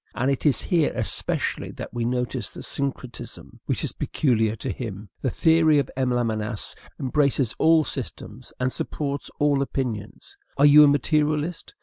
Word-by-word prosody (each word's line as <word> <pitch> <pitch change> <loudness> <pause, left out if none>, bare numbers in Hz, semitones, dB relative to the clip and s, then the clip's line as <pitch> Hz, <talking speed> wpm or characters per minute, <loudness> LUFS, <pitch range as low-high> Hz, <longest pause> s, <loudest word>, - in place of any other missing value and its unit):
And 125 +5 +1
it 135 +3 0
is 135 -6 +3
here 170 -6 +2
especially - - -1
that - - -8
we 120 -1 -2
notice 125 -1 -2
the - - -9
syncretism 135 -3 -4
which - - -1
is - - -1
peculiar 115 -6 0
to 115 - -4
him. 105 -4 -6
The 130 - 0
theory 160 +1 +4
of 140 - 0
M. 130 -1 0
Lamennais 110 -3 -1 0.3
embraces 135 -2 +1
all 160 -1 +5
systems, 125 -3 -6
and 125 0 0
supports 140 -2 -3
all 145 -1 +2
opinions. 125 - -4 0.2
Are 140 - +5
you 150 +1 +9
a - - +7
materialist? 150 +3 0
135 Hz, 155 wpm, -24 LUFS, 120-150 Hz, 0.3 s, you